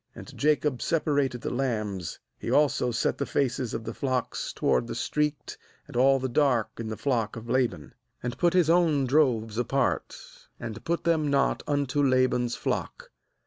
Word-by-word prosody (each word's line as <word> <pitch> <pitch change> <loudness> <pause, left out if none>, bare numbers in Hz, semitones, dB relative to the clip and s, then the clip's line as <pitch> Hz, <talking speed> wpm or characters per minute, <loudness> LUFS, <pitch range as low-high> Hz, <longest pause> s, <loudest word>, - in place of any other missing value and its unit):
40And - - -10
Jacob 150 -3 +1
separated 145 -6 0
the - - -3
lambs 105 - -2
— - - -51
he - - -5
also 145 -4 +3
set 120 -1 -1
the 140 - 0
faces 130 -3 -1
of 110 - -4
the 115 0 -5
flocks 130 -1 -2
toward 60 -1 +1
the - - -5
streaked 150 0 -2 0.3
and - - -13
all 135 +2 +5
the 130 0 -2
dark 125 -3 +2
in 115 - -4
the 110 -1 -4
flock 115 -6 -1
of 115 +1 -8
La 130 0 +3
ban 75 -10 -12
— - - -39
and 120 +1 -4
put 175 -1 +3
his 180 -4 +4
own 165 -5 +3
droves 120 -6 +2
apart, 135 +1 0 0.4
and 115 -2 -7
put 170 +1 -1
them 160 -3 +2
not 140 -1 +2
unto 145 -1 0
Laban's 130 -3 +2
flock. - - -4
130 Hz, 185 wpm, -27 LUFS, 120-145 Hz, 0.4 s, all